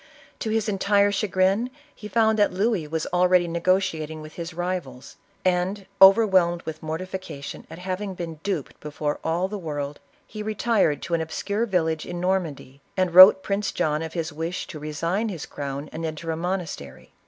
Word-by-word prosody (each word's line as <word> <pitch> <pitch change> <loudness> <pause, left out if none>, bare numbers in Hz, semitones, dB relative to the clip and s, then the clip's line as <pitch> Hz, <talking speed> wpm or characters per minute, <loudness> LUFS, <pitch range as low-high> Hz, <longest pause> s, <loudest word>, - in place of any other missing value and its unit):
To 225 - -3
his 220 -1 0
entire 200 0 +3
chagrin, 195 +3 +1 0.2
he 210 - -9
found 220 0 +2
that 205 - +4
Louis 195 -4 0
was 160 0 -2
already 180 0 +4
negotiating 165 -3 0
with 155 0 -10
his 170 0 -6
rivals, 175 -7 -5 0.3
and, 185 +2 0 0.2
overwhelmed 190 -4 +6
with 155 -1 -6
mortification 160 -2 -6
at 165 - -9
having 185 +2 -4
been 165 -3 -6
duped 185 -8 -4
before 150 0 -3
all 170 +3 0
the 205 +1 -5
world, 145 -4 -4 0.3
he 215 - -8
retired 215 -6 +1
to 170 - -4
an 165 - +2
obscure 205 +7 -2
village 160 -5 0
in 175 - -5
Normandy, 165 -7 -2 0.2
and 185 -2 +1
wrote 185 +1 +10
Prince 200 0 -1
John 150 0 0
of 160 -1 -5
his 165 -2 -3
wish 165 +4 -3
to 155 - -9
resign 165 +8 -2
his 170 -7 -5
crown 140 +1 -5
and 160 - -5
enter 160 +1 -4
a - - -1
monastery. 165 - -5
175 Hz, 170 wpm, -24 LUFS, 160-195 Hz, 0.3 s, wrote